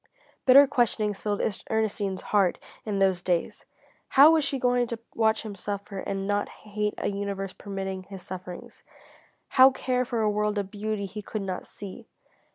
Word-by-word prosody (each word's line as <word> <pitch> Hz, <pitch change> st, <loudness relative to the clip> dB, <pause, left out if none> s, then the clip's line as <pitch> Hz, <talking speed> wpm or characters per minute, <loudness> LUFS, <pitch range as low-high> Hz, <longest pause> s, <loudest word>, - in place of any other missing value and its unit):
Bitter 275 Hz, +2 st, +9 dB
questionings 220 Hz, -6 st, 0 dB
filled 205 Hz, -1 st, -1 dB, 0.3 s
Ernestine's 210 Hz, -3 st, -1 dB
heart 195 Hz, -4 st, +3 dB, 0.3 s
in 210 Hz, -2 st, -2 dB
those 190 Hz, -2 st, +2 dB
days. 175 Hz, -2 st, -1 dB, 0.4 s
How 285 Hz, +4 st, +8 dB
was 320 Hz, -2 st, +3 dB
she 280 Hz, -1 st, -1 dB
going 245 Hz, -1 st, +2 dB
to 235 Hz, -, -4 dB, 0.2 s
watch 220 Hz, -1 st, +2 dB
him 215 Hz, -2 st, -6 dB
suffer 200 Hz, 0 st, -5 dB
and 195 Hz, 0 st, -3 dB
not 205 Hz, 0 st, 0 dB
hate 210 Hz, 0 st, -4 dB
a -, -, -2 dB
universe 200 Hz, -1 st, -4 dB
permitting 195 Hz, -2 st, -5 dB
his 190 Hz, -1 st, -10 dB
sufferings? 180 Hz, 0 st, -9 dB, 0.7 s
How 260 Hz, 0 st, +8 dB
care 255 Hz, -1 st, -1 dB
for 235 Hz, -2 st, -2 dB
a 215 Hz, -1 st, +2 dB
world 210 Hz, 0 st, 0 dB
of 200 Hz, -1 st, -3 dB
beauty 210 Hz, -1 st, -3 dB
he 205 Hz, +2 st, -7 dB
could 210 Hz, 0 st, -5 dB
not 185 Hz, -2 st, -4 dB
see? 195 Hz, -2 st, -9 dB
205 Hz, 165 wpm, -27 LUFS, 195-225 Hz, 0.7 s, Bitter